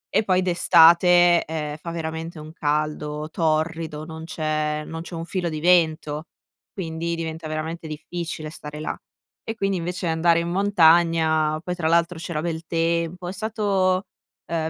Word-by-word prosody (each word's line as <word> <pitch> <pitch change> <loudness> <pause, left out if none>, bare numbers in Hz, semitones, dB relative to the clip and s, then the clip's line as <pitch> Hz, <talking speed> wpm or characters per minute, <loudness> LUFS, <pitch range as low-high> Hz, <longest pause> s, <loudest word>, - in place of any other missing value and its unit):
E - - +4
poi 185 -2 +2
d'estate, 175 0 +6
ehm, 150 -1 -4
fa 170 - -8
veramente 160 0 -5
un 155 +1 -10
caldo 150 -1 -2
torrido, 160 -1 -1
non 160 0 -8
c'è 155 -1 -2
non 165 0 -6
c'è 170 0 -8
un 165 0 -5
filo 175 -1 -2
di 155 -1 -4
vento, 160 -3 +2 0.5
quindi 170 -2 -3
diventa 160 -1 -5
veramente 160 +1 -4
difficile 155 0 -5
stare 150 -1 -8
là. 155 - -3 0.5
E, 225 - -5
quindi, 195 -3 0
invece 180 +2 -4
andare 165 +1 +3
in 170 0 -2
montagna 165 -4 +3
poi 180 - -3
tra 165 -3 -1
l'altro 170 0 +2
c'era 165 -2 -3
bel 165 -1 -3
tempo, 170 +1 -1
è 185 - -4
stato, 200 -3 0 0.5
uhm, 160 -1 -1
165 Hz, 155 wpm, -23 LUFS, 155-175 Hz, 0.5 s, d'estate